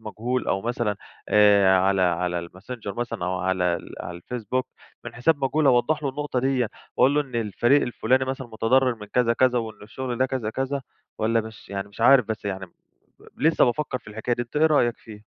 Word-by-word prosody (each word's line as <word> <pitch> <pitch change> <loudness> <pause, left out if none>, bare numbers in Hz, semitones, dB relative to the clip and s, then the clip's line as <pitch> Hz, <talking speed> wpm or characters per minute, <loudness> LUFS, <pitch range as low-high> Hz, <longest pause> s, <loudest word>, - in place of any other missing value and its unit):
مجهول 115 +4 -3
أو 95 - 0
مثلًا 115 -3 -1 0.3
آآ، 100 -2 +5
على 95 0 +2
على 90 0 0
الماسنجر 100 +5 -8
مثلًا 120 -7 -4
أو 90 0 -1
على 95 0 0
ال - - -10
على 85 - -6
الفيسبوك 125 +6 -3 0.4
من - - -8
حساب 140 +4 +1
مجهول 145 +3 +1
أوضّح 135 +4 +3
لُه 140 - 0
النقطة 145 -1 -3
ديَّة، 130 -3 +1 0.3
وأقول 135 +2 +4
له 150 - +3
إن 135 -4 -7
الفريق 120 +5 +2
الفُلاني 130 +2 +1
مثلًا 130 -1 -4
متضرّر 120 +3 +2
من 105 -2 -11
كذا، 115 +2 +2
كذا 125 0 +3
وإن 110 -2 -6
الشغل 120 +3 -5
ده 130 - +3
كذا، 130 -5 -3
كذا، 135 +3 -2 0.4
والَّا 115 +1 +2
مش 110 -1 -11
يعني 100 0 -4
مش 100 - -14
عارف 125 +1 +6
بس 110 -1 -5
يعني 95 -1 -4
ب - - -27 0.7
لسّه 160 +1 +4
بافكّر 125 +1 -1
في - - -29
الحكاية 110 +3 -2
دي، 120 - -2
أنت 120 +5 -10
إيه 160 +1 +5
رأيك 120 -6 +2
فيها؟ 105 -1 -13
120 Hz, 205 wpm, -24 LUFS, 105-130 Hz, 0.7 s, عارف